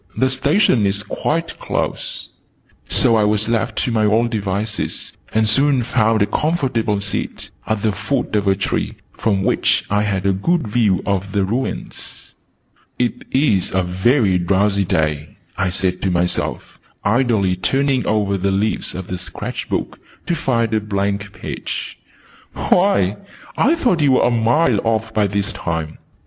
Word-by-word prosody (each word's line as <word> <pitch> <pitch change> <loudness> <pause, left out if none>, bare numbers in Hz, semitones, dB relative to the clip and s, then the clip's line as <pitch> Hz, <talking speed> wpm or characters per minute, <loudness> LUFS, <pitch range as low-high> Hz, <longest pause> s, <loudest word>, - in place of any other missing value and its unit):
"The 130 0 +2
Station 130 - +3
is 100 +1 -1
quite 165 +8 -2
close." - - -3 0.6
So 115 -2 +3
I 110 - +3
was 105 0 +1
left 115 -1 -1
to 125 - -1
my 110 -2 +2
own 115 +3 +3
devices, 105 -1 -3 0.2
and 110 0 +2
soon 135 +3 +3
found 110 -2 +2
a - - +3
comfortable 120 -5 0
seat, 100 0 -4 0.2
at 110 -2 -1
the 110 - +2
foot 105 +5 -2
of 105 -1 +1
a 95 - +4
tree, 95 - -2 0.2
from 100 -3 0
which - - +2
I 105 0 +3
had 100 -3 -1
a 100 - +3
good 160 - 0
view 105 -4 +1
of 100 -1 -1
the 100 -1 +2
ruins. 120 +7 -5 0.6
"It 125 -1 -1
is 115 -9 +2
a 95 - +2
very 95 +2 +2
drowsy 100 +2 +2
day," 75 -3 -1 0.2
I 95 0 0
said 90 0 -1
to 95 - 0
myself, 90 0 -1 0.2
idly 105 -4 +2
turning 135 +7 0
over 100 -2 +1
the 100 +2 0
leaves 100 +3 -1
of 95 0 -5
the 90 0 -5
sketch 90 - -6
book - - -3 0.3
to - - 0
find 115 -8 0
a 110 - +3
blank 100 -1 -2
page. - - -6 0.5
"Why, 140 - +2 0.4
I 315 - +3
thought 240 - +1
you 140 -3 +4
were - - +4
a 120 - +3
mile 120 +1 +3
off 115 0 -1
by 105 -2 +2
this 100 0 -1
time!" 80 -2 -4
105 Hz, 160 wpm, -19 LUFS, 100-120 Hz, 0.6 s, a